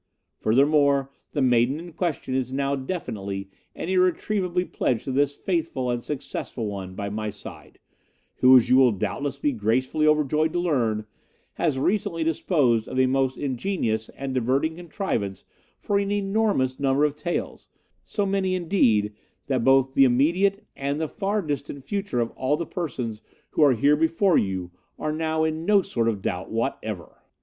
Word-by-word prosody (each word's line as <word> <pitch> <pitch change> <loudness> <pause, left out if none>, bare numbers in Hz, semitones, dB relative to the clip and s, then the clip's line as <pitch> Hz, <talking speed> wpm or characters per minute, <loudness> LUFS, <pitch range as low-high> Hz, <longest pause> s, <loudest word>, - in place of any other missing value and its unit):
Furthermore, 140 +2 +3 0.2
the 145 - +1
maiden 125 +2 +3
in 170 0 -10
question 160 -7 -2
is 130 -1 -1
now 140 +1 0
definitely 100 - -5 0.2
and - - -5
irretrievably 185 0 +1
pledged 120 -9 -1
to 135 - -4
this 140 +1 +1
faithful 160 -9 -1
and 120 -1 -2
successful 135 -4 -4
one 95 -3 -5
by 100 0 -4
my 105 +1 -3
side, 105 - -11 0.6
who, 130 0 +8
as 125 - +3
you 130 +1 +5
will 130 -3 +5
doubtless 110 +8 -3
be 145 +1 0
gracefully 130 +6 +1
overjoyed 155 +1 +2
to 175 - 0
learn, 120 -11 0 0.5
has 155 -6 0
recently 165 +1 0
disposed 145 - +1
of 130 - -2
a 130 - +5
most 130 0 +1
ingenious 125 - -2
and 135 -1 -4
diverting 130 +6 +1
contrivance 165 - -3 0.3
for 200 -1 0
an 200 0 -1
enormous 200 -10 0
number 140 +1 +3
of 150 -1 -1
taels, 175 +3 -4 0.3
so 205 - -2
many, 195 -1 0
indeed, 120 - +2 0.3
that 130 -4 0
both 135 0 +4
the 135 - +6
immediate 175 - +2
and 140 +2 -2
the 160 - -1
far 200 +5 -2
distant 145 -2 -4
future 200 - -2
of 115 -1 0
all 130 +3 0
the 170 - -3
persons 125 -12 -4 0.3
who - - 0
are 145 -3 +6
here 140 +6 +4
before 165 +4 +2
you 95 -3 -3 0.3
are 155 - -2
now 160 0 0
in 160 0 -1
no 200 +1 +4
sort 115 -7 -1
of 105 -4 -1
doubt 90 +1 -3
whatever. 110 -5 -4
140 Hz, 165 wpm, -25 LUFS, 120-165 Hz, 0.6 s, who